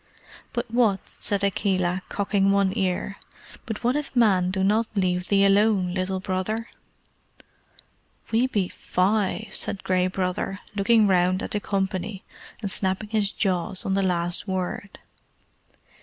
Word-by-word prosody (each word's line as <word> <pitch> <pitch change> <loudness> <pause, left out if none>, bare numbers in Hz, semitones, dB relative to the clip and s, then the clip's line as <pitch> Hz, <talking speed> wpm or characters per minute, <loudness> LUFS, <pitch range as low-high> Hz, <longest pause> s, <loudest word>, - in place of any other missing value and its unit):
"But 240 -1 -3
what," 225 -5 +3
said 200 -1 -2
Akela, 185 -2 +1
cocking 200 -1 +1
one 195 0 +2
ear 195 0 -1 0.5
"but 220 -2 -5
what 245 +3 +2
if 295 -2 -3
men 195 -7 +4
do 190 0 -1
not 215 +3 +2
leave 180 -2 0
thee 200 -1 +4
alone, 195 -2 +3
Little 185 0 -1
Brother?" 190 +5 -2 1.6
"We 235 +3 +3
be 205 -7 0
FIVE," 205 +4 0
said 195 - -1
Gray 185 -1 +2
Brother, 185 +1 -2 0.2
looking 215 +2 +4
round 185 -1 +2
at - - -5
the 210 - 0
company, 195 0 -2 0.4
and 200 - -2
snapping 190 +3 -1
his 210 -2 +1
jaws 185 0 -1
on 195 - 0
the 195 - +2
last 175 0 0
word. 190 +1 -3
195 Hz, 140 wpm, -25 LUFS, 185-210 Hz, 1.6 s, men